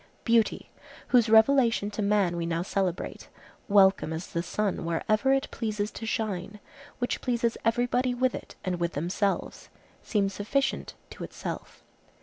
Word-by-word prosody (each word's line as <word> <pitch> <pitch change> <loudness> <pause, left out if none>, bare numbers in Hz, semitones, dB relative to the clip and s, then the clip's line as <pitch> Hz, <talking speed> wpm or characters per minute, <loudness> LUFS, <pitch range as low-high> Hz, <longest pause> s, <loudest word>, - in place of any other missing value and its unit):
Beauty, 230 -2 +1 0.4
whose 235 -3 +4
revelation 225 -2 +4
to 210 - -3
man 200 -4 +2
we 170 -1 -2
now 170 0 -1
celebrate, 190 -2 -3 0.4
welcome 195 -4 +4
as 160 +2 -4
the 170 - -3
sun 195 +3 -2
wherever 215 +10 +1
it 270 0 +1
pleases 210 -2 -2
to 225 - -7
shine, 210 -3 -3 0.4
which 245 - -2
pleases 235 -2 0
everybody 245 +2 +1
with 255 0 +1
it - - -8
and 180 -1 -1
with 170 0 -1
themselves, 180 +6 -2 0.3
seems 200 -3 0
sufficient 270 +8 -1 0.2
to - - -8
itself. - - -7
210 Hz, 140 wpm, -28 LUFS, 185-235 Hz, 0.4 s, whose